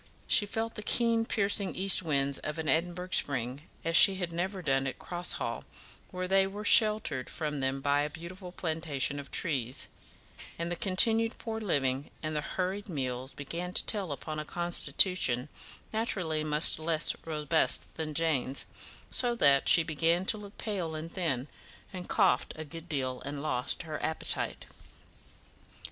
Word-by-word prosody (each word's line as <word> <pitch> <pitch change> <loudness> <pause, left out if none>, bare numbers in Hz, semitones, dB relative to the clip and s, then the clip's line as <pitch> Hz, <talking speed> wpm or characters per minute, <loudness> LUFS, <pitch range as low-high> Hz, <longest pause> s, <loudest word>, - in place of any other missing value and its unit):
She 205 - +4
felt 225 +2 -3
the - - -7
keen 230 +1 +1
piercing 200 -1 +1
east 195 +1 +4
winds 140 -4 0
of 155 +1 -5
an 160 -1 -4
Edinburgh 175 +4 -1
spring 130 0 -1 0.2
as 165 0 0
she 195 - +8
had 180 -2 -4
never 185 +3 -4
done 135 -2 0
at 130 - -5
Cross 175 0 -2
Hall, - - -4 0.5
where 185 -1 -5
they 195 +1 +3
were 205 +2 -7
sheltered 210 - +4
from 150 -3 -4
them 135 0 -2
by 145 +1 +1
a 150 - -2
beautiful 180 +4 -10
plantation 155 -5 -2
of 140 - -9
trees; 130 -7 0 0.7
and 170 +1 -4
the - - -1
continued 225 +5 +4
poor 225 -1 -5
living 140 -7 -1
and 155 0 -3
the 150 - -1
hurried 190 +6 -4
meals 130 -4 -4
began 170 +6 -6
to - - +3
tell 200 -7 0
upon 155 +2 -5
a - - -3
constitution 175 -5 +3 0.4
naturally 180 -9 0
much 155 +1 +5
less 160 0 +1
robust 150 -4 0
than 155 -2 -5
Jane's, 140 -4 +1 0.5
so 240 -1 +1
that 140 -10 +4
she 165 - +6
began 165 +3 0
to 215 - +1
look 205 -1 -12
pale 180 -7 -4
and 160 +2 -7
thin, 150 -8 -2 0.5
and 180 -1 -8
coughed 195 -4 +2
a 155 - -7
good 165 +3 -11
deal, 130 -4 -3
and 140 +1 -6
lost 125 +1 -1
her 155 -2 -6
appetite. 160 - 0
165 Hz, 160 wpm, -29 LUFS, 145-190 Hz, 0.7 s, she